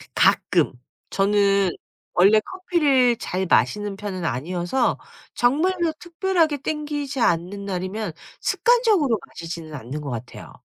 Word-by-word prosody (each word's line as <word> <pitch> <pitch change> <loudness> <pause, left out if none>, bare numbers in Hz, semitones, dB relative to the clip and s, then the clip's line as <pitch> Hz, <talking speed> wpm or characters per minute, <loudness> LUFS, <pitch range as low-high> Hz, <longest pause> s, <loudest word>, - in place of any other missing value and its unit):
가끔. - - +3 0.4
저는 200 -1 +3 0.4
원래 200 +4 +6
커피를 285 - +2
잘 190 -4 -3
마시는 205 -1 +2
편은 195 -4 -5
아니어서 175 - -1 0.4
정말로 325 +6 +1
특별하게 345 -3 0
땡기지 290 -2 -3
않는 185 +1 0
날이면 185 0 -3 0.3
습관적으로 435 - +3
마시지는 165 -2 -8
않는 140 +2 -6
것 140 - -6
같아요. 115 -2 -8
210 Hz, 275 characters per minute, -23 LUFS, 180-300 Hz, 0.4 s, 원래